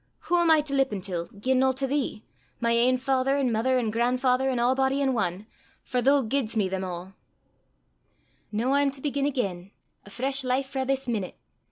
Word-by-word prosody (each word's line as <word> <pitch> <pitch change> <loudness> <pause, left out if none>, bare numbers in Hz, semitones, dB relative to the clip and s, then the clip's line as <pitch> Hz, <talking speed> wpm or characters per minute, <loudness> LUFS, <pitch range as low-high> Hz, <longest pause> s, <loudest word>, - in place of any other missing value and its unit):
Wha 350 0 +4
am 340 - +3
I 315 -1 +6
to 290 -1 -5
lippen 265 -7 +1
til, 180 -3 -4
gien 255 +8 -1
no 265 0 +3
to 270 +1 -2
thee, 270 -5 -2 0.4
my 235 0 +1
ain 245 +2 +3
father 265 +1 +1
an' 265 -3 +1
mither 245 +4 +1
an' 230 -4 0
gran'father 250 +3 +1
an' 255 - -1
a'body 265 +3 +2
in 270 -2 +1
ane, 190 -2 -2 0.4
for 250 -1 -1
thoo 275 +2 +4
giedst 235 -1 -1
me 205 -3 +2
them 190 0 -3
a'! 180 +1 -6 1.4
"Noo 230 +5 0
I'm 280 0 +3
to 275 0 -7
begin 285 -1 -1
again 195 -10 -3 0.3
a - - -14
fresh 265 +5 -1
life 255 +2 0
frae 265 -1 -2
this 270 0 -1
meenute! 210 -6 -3
255 Hz, 195 wpm, -26 LUFS, 220-270 Hz, 1.4 s, I